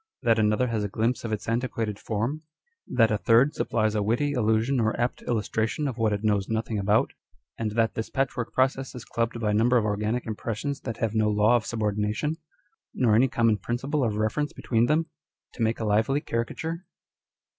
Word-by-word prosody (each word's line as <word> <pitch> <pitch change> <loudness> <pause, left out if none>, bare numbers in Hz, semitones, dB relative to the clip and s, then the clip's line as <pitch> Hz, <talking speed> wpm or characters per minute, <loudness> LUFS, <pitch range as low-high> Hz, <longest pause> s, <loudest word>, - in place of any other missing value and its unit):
] - - -43
â€" - - +2
that 115 0 +5
another 105 +3 +2
has 110 -3 -1
a - - -1
glimpse 115 +5 -1
of 115 - -4
its 110 - -3
antiquated 115 -3 -2
form; 115 +8 -2 0.5
that 115 -2 +3
a 105 - +1
third 120 +7 +4
supplies 110 -2 0
a 105 - 0
witty 120 +8 +1
allusion 115 +2 +1
or 110 0 0
apt 120 +1 -1
illustration 110 +4 -1
of 125 -3 -4
what 110 -1 +2
it 105 0 -2
knows 105 -2 +1
nothing 110 -1 -1
about; 105 +3 +2 0.5
and 110 -2 -2
that 115 0 +1
this 110 - -4
patchwork 130 -3 -2
process 130 0 0
is 125 -3 -8
clubbed 115 +1 -2
by 105 -2 0
a - - 0
number 120 +4 +4
of 110 - +1
organic 105 +3 -1
impressions 115 +5 -3
that 115 -4 -5
have 110 -2 -1
no 110 -1 +2
law 105 +3 +4
of 115 -2 0
subordination, 105 +7 -1 0.6
nor 120 -4 +3
any 120 +5 +5
common 115 -4 +2
principle 135 +8 -1
of 110 -3 0
reference 110 +8 -1
between 115 0 +1
them, 155 +2 +2 0.5
to - - -8
make 115 0 +1
a 110 - -2
lively 110 +7 +2
caricature 160 +9 -4
115 Hz, 200 wpm, -26 LUFS, 110-125 Hz, 0.6 s, that